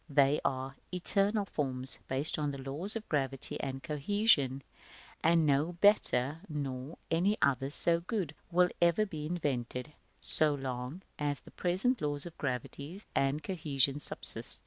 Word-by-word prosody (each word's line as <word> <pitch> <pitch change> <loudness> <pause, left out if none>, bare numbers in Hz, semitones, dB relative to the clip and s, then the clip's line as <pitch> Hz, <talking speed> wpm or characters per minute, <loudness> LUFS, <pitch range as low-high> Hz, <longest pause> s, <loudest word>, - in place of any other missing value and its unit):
They 140 0 +3
are 135 0 -3
eternal 200 +3 +3
forms, 130 -6 -4
based 135 +4 +1
on 145 -1 -2
laws 155 +11 -3
of 220 -1 -6
gravity 135 -3 -2
and 135 0 -5
cohesion; 145 - +1 0.6
and 165 0 +3
no 145 +4 +1
better, 165 -7 +2
nor 140 -1 -5
any 190 +6 +1
others 135 +1 +1
so 170 -1 +3
good, 180 -4 -4 0.2
will 180 +1 +3
ever 170 +5 +3
be 155 -6 -6
invented, 140 -4 -3 0.3
so 150 -1 +7
long 130 +5 -6 0.2
as 145 -1 -2
the - - -16
present 190 +7 0
laws 145 -1 -2
of 170 - -9
gravity 140 +6 -5
and 140 +3 0
cohesion 145 -6 +1
subsist. - - +4
150 Hz, 140 wpm, -31 LUFS, 135-175 Hz, 0.6 s, so